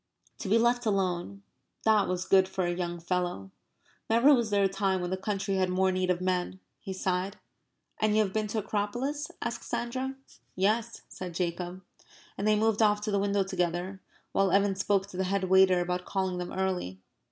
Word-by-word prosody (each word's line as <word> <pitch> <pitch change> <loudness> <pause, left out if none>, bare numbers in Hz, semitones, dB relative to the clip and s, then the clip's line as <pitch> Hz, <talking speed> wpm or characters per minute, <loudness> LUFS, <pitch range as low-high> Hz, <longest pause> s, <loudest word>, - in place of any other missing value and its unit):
To 195 - -4
be 220 - +5
left 240 +1 +2
alone 195 -1 -1 0.4
that 215 -2 +4
was 180 0 -2
good 190 -1 +5
for 185 -1 -1
a 175 - 0
young 175 -1 -3
fellow. 175 - -2 0.6
Never 235 +6 +6
was 235 -4 +2
there 200 -1 +2
a - - +5
time 195 -1 0
when 180 0 -3
the - - +1
country 195 0 -2
had 185 -1 +1
more 190 +1 +2
need 185 0 -1
of 180 0 +1
men. 185 0 -1 0.2
He 195 - -7
sighed. 190 +1 -2 0.6
"And 215 -1 +2
you 215 - +5
have 195 -2 -4
been 215 -1 0
to 215 +1 -2
the - - -15
Acropolis?" 245 +9 -2
asked - - -4
Sandra. 260 +3 -3 0.4
"Yes," 215 +5 0
said 180 -2 -7
Jacob. 180 +1 -3 0.5
And 200 - -2
they 215 - +5
moved 220 0 +2
off 210 -1 +4
to 210 0 -2
the 200 - +2
window 200 0 +1
together, 185 0 -2 0.3
while 195 0 +2
Evan 200 +1 +3
spoke 195 0 +1
to 185 - -9
the 190 - 0
head 195 +1 0
waiter 185 -1 +5
about 180 +1 -2
calling 190 -2 -1
them 180 - -5
early. 185 - -2
190 Hz, 200 wpm, -29 LUFS, 180-210 Hz, 0.6 s, Never